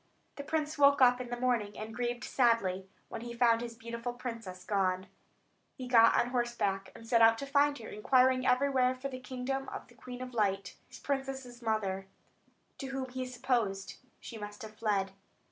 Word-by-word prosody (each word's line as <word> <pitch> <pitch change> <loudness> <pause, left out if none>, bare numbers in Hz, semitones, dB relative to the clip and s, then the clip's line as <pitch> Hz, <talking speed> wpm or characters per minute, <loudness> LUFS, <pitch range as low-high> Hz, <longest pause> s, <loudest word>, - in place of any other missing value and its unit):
The 285 - -5
prince 305 0 -2
woke 280 0 +6
up 250 -1 +5
in 245 - -7
the 245 0 -4
morning, 235 -5 0
and 220 +1 -6
grieved 240 0 -2
sadly, 195 -7 +1 0.2
when 230 - -6
he 235 0 -7
found 235 -1 +4
his 235 -1 -6
beautiful 235 +1 -5
princess 230 -7 -7
gone. 185 -3 +1
Then 190 - -17 0.7
he 255 - -7
got 230 -2 +6
on 245 - 0
horseback, 240 -6 -1
and 230 - -12
set 230 -1 +4
out 225 0 +7
to 275 - -5
find 285 +1 +3
her, 225 - -9
inquiring 255 +4 +3
everywhere 255 0 +3
for 265 +2 -5
the 255 -1 -6
kingdom 260 +1 -4
of - - -7
the - - -17
Queen 250 0 -8
of 250 -1 -8
Light 195 -4 0
his - - -12
princess's 270 -3 -4
mother 200 -4 -1 0.7
to 270 - -4
whom 265 -1 -4
he 255 0 -4
supposed 235 -6 -1 0.2
she 225 - -9
must 205 0 -8
have 215 0 -9
fled. 200 -3 0
240 Hz, 190 wpm, -32 LUFS, 215-255 Hz, 0.7 s, out